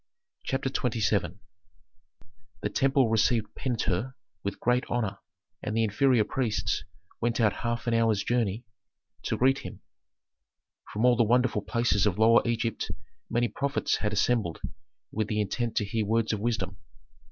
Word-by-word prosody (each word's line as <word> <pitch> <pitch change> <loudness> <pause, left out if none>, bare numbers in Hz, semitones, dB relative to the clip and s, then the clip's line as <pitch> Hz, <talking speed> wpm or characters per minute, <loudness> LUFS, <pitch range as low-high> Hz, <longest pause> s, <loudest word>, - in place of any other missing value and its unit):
CHAPTER 135 0 -1
XXVII 105 - 0 1.2
The - - -1
temple 135 -3 +2
received 110 0 +2
Pentuer 120 -1 -2 0.3
with 100 - -3
great 125 +1 +2
honor, 110 -5 -1 0.4
and 105 - -3
the 115 - +3
inferior 115 +2 +3
priests 120 -2 -1 0.4
went 120 +1 0
out 110 -3 +2
half 120 0 -2
an 120 - +1
hour's 115 -3 +2
journey 115 -1 0 0.6
to - - -2
greet 135 +2 +3
him. - - -9 1.1
From 110 +4 0
all 125 -1 +6
the 120 - +2
wonderful 120 -1 +2
places 115 -3 +1
of 95 - 0
Lower 115 +2 +6
Egypt 115 -1 -1 0.4
many 120 +1 +1
prophets 140 +3 -1
had 105 - -1
assembled 105 -4 +1 0.5
with 110 -1 -1
the 105 0 -1
intent 115 +3 -1
to 105 - +2
hear 110 +2 -1
words 115 +1 +1
of 105 - -1
wisdom. 100 -4 -2
115 Hz, 145 wpm, -28 LUFS, 105-120 Hz, 1.2 s, all